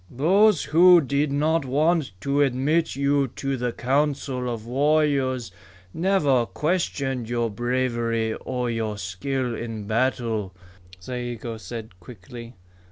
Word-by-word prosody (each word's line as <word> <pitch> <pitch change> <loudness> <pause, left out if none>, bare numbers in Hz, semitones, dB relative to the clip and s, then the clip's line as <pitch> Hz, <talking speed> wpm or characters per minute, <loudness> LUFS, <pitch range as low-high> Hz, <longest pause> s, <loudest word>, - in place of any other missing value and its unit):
"Those 185 - +3
who 175 +4 +6
did 140 0 0
not 155 +3 +1
want 150 - +1
to 140 +1 +1
admit 140 +5 +1
you 140 0 +1
to 135 0 -2
the 125 -1 -2
Council 130 -1 -1
of 115 -2 -6
Warriors 135 -3 +1 0.4
never 150 -10 +2
questioned 140 -7 -2
your 120 -2 -1
bravery 120 -1 -1
or 125 +1 -3
your 110 -3 -2
skill 120 +7 -3
in 115 -2 -5
battle," 115 -4 -1 0.4
Zayigo 120 +1 -5
said 110 -4 -9
quickly. 120 +4 -11
130 Hz, 115 wpm, -24 LUFS, 115-145 Hz, 0.4 s, who